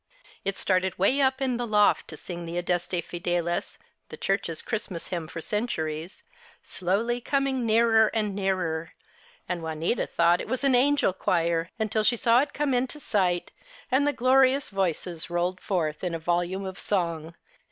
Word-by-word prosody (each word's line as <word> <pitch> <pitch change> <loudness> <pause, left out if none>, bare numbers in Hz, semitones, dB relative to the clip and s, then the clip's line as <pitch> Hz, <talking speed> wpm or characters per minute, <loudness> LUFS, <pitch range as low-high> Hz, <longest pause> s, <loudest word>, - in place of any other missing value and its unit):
It 195 0 -1
started 185 -1 +1
way 255 +10 +3
up 265 0 +2
in 255 -2 0
the 240 0 -3
loft 210 -1 +3
to 155 - -8
sing 175 +1 -7
the 170 +1 -4
Adeste 175 0 -1
Fideles, 175 0 -2 0.3
the - - -8
Church's 195 -5 -1
Christmas 210 -7 -4
hymn 170 -3 -3
for 165 - -7
centuries, 165 -6 -3 0.4
slowly 220 +7 -1
coming 270 -2 0
nearer 225 0 +5
and 210 -3 -1
nearer; 180 -5 -1 0.5
and 180 -1 -2
Juanita 160 +7 -1
thought 170 +1 +3
it - - -7
was 255 +3 -2
an 275 -1 +4
angel 270 -4 +3
choir 170 -2 0
until 220 -1 0
she 240 - +4
saw 230 +2 +4
it 285 0 -2
come 290 -2 0
into 255 +4 -1
sight 185 -9 0 0.4
and 275 +3 +3
the - - +4
glorious 265 +1 +3
voices 180 -3 -2
rolled 175 +2 -1
forth 160 -5 -1
in 175 -2 -1
a - - -1
volume 175 +3 -1
of 190 0 -6
song. 170 -4 -2
190 Hz, 165 wpm, -27 LUFS, 170-240 Hz, 0.5 s, nearer